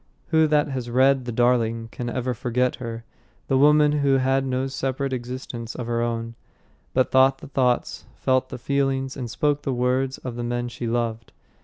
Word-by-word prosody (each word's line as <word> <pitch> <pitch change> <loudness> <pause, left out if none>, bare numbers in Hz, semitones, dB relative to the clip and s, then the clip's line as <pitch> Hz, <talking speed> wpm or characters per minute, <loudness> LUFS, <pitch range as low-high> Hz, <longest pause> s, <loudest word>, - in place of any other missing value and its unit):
Who 160 -1 +4
that 150 0 +2
has 130 -3 -4
read 130 +1 +3
The 120 - -3
Darling 115 -1 +1
can 120 -1 -4
ever 125 +1 -2
forget 125 +2 0
her 115 -2 -6 0.4
the 135 - +1
woman 150 +1 +5
who 140 -2 +2
had 135 +1 +1
no 130 0 0
separate 135 0 -2
existence 120 -2 -6
of 125 - -4
her 115 0 -1
own, 115 -1 -2 0.6
but 130 0 +2
thought 135 +1 +5
the - - -11
thoughts, 125 -3 0
felt 130 0 +1
the - - -6
feelings, 135 0 -1
and 125 -3 -5
spoke 145 +4 0
the 140 - -2
words 130 +2 0
of 125 -2 -7
the 120 - -3
men 120 0 -2
she 120 0 -5
loved? 115 -1 -2
130 Hz, 185 wpm, -24 LUFS, 120-135 Hz, 0.6 s, woman